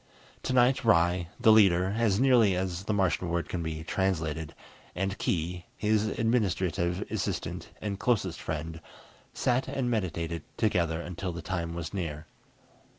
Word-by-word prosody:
Tonight 130 +1 +3
Ry, 90 -4 +3
the 115 -2 +6
leader 95 -3 +5
(as 110 -3 +2
nearly 120 -7 +5
as 90 0 -3
the - - -1
Martian 90 -3 +1
word 85 0 -1
can 90 - -3
be 80 -1 -4
translated), 80 -5 -1 0.4
and 95 +2 -1
Khee, 85 +1 -2
his 110 0 +2
administrative 95 -6 0
assistant 105 -5 -3
and 100 -2 -4
closest 95 -9 0
friend, 80 +1 -4 0.5
sat 125 +1 +1
and 130 -3 -1
meditated 85 -6 -2 0.2
together 85 -7 +1
until 90 +1 -4
the 85 -1 -7
time 85 -1 -3
was 85 0 -5
near. 80 -6 -4
90 Hz, 140 wpm, -29 LUFS, 85-110 Hz, 0.5 s, the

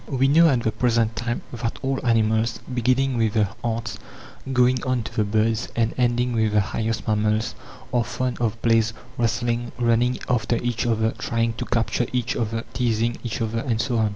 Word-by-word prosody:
(25) 135 -4 -3
We 135 - +5
know 165 +3 +6
at 130 -4 +2
the 110 - +1
present 115 -1 +1
time 120 0 -3
that 115 -1 -3
all 135 0 -1
animals, 110 -1 +2
beginning 130 +2 +1
with 110 -2 +2
the 105 -3 +2
ants, 115 0 -3 0.5
going 125 0 +3
on 130 -3 0
to - - -8
the 110 - +2
birds, 110 +2 +1
and 115 -1 +1
ending 120 0 +1
with 110 -2 +1
the 105 - +5
highest 110 +2 -2
mammals, 110 +1 +1 0.4
are 120 -1 +3
fond 125 +2 -3
of 115 -1 -1
plays, 115 -1 +3 0.3
wrestling, 120 +1 0
running 120 +1 +2
after 120 -1 +1
each 120 0 -1
other, 110 -1 +1
trying 115 0 0
to 110 - -5
capture 115 +1 0
each 125 0 -1
other, 115 -1 -2
teasing 120 -1 0
each 120 0 -3
other, 115 +1 -2
and 115 -2 -1
so 115 +1 0
on. 110 -1 +2
115 Hz, 190 wpm, -23 LUFS, 110-120 Hz, 0.5 s, know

